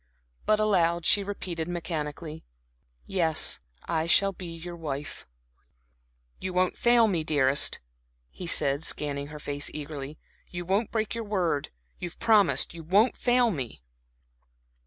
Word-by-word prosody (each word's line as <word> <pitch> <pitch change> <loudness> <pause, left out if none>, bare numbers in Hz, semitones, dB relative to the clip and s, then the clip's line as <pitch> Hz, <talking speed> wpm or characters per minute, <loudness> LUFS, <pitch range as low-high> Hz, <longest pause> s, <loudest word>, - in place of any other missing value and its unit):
But 215 0 +4
aloud 175 -5 +2
she 205 - +4
repeated 180 -5 -5
mechanically: 160 -2 -5 0.6
"Yes, 165 -5 +1 0.3
I 160 0 -1
shall 195 +3 +4
be 180 -1 -8
your 170 +1 -8
wife." 145 -3 -6 1.1
"You 185 -1 -4
won't 180 0 +1
fail 240 -1 +5
me, 175 -6 0
dearest," 145 -3 +4 0.5
he 180 - -8
said, 140 -2 +2
scanning 145 -2 -1
her 150 +1 -9
face 145 -1 -3
eagerly. 150 -1 -6 0.3
"You 175 0 -6
won't 200 +5 0
break 220 -2 -1
your 230 0 -4
word? 180 -9 -1 0.3
You 175 - -4
have - - -17
promised 210 -8 +3
you 170 - -8
won't 200 +9 +3
fail 245 -1 +3
me?" 125 - -6
170 Hz, 135 wpm, -27 LUFS, 150-195 Hz, 1.1 s, fail